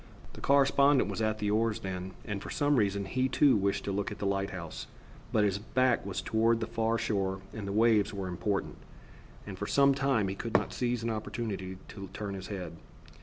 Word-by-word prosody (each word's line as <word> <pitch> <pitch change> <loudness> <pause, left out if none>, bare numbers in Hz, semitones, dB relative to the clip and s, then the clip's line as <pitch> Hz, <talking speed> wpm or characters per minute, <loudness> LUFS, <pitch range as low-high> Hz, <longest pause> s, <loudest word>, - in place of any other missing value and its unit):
The - - -11
correspondent 140 -3 +4
was 100 - -3
at 110 0 +1
the 105 -1 -1
oars 110 0 +1
then, 95 0 -5
and 105 -3 -4
for - - -7
some 145 -1 +2
reason 100 -2 +1
he 130 +6 0
too 135 +1 +5
wished 100 -1 0
to 100 - -2
look 100 +1 -2
at 105 - -6
the 105 - -4
lighthouse, 95 -4 -3 0.4
but 105 - +3
his 100 -1 +1
back 130 +3 +1
was 95 -1 -3
toward 115 +3 +2
the 110 - -1
far 115 0 0
shore 95 -4 -1
and 105 -3 -5
the - - -2
waves 110 -1 +3
were 95 -2 -4
important, 95 +3 -2 0.7
and - - -8
for - - -3
some 140 0 +5
time 135 -6 +1
he 95 - -2
could 115 +3 -6
not - - +2
seize 120 -2 -1
an 115 - 0
opportunity 105 -4 -4
to 95 -2 -8
turn 100 -2 -4
his 95 -1 -6
head. 90 -5 -6
105 Hz, 210 wpm, -30 LUFS, 95-115 Hz, 0.7 s, too